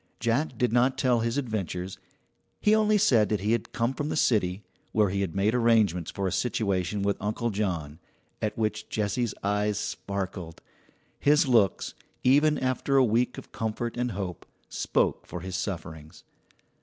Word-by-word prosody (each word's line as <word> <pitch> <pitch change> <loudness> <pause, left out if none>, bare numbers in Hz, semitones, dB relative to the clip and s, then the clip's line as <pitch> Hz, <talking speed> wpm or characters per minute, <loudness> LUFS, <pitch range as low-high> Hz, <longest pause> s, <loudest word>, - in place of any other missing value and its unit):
Jack 120 +4 0
did 125 -1 +1
not 125 +2 +3
tell 125 -2 +2
his 115 +3 -1
adventures; 95 -8 -3 0.6
he 210 - +3
only 215 -1 +4
said 120 - +4
that 105 -3 0
he 105 +2 0
had 115 -1 -1
come 115 +3 0
from 145 +2 -3
the - - -2
city, 105 -8 +1 0.3
where 105 -2 +3
he 100 0 -1
had 95 -3 -3
made 100 +3 +2
arrangements 110 -8 +3
for 100 - -3
a - - -1
situation 100 -2 0
with 100 0 +1
Uncle 110 +3 -1
John 85 -7 -2 0.4
at 105 - -2
which 105 -1 -2
Jessie's 110 +2 -1
eyes 105 0 +1
sparkled. 95 -4 -4 0.6
His 150 +2 +4
looks, 115 -7 +2 0.3
even 150 +4 +4
after 130 +1 0
a 130 - +6
week 120 +2 +1
of - - -10
comfort 115 +1 -3
and 125 -1 -1
hope, 95 -3 -5 0.2
spoke - - 0
for 90 - -6
his 95 0 -5
sufferings. 80 -5 -6
110 Hz, 165 wpm, -27 LUFS, 95-125 Hz, 0.6 s, a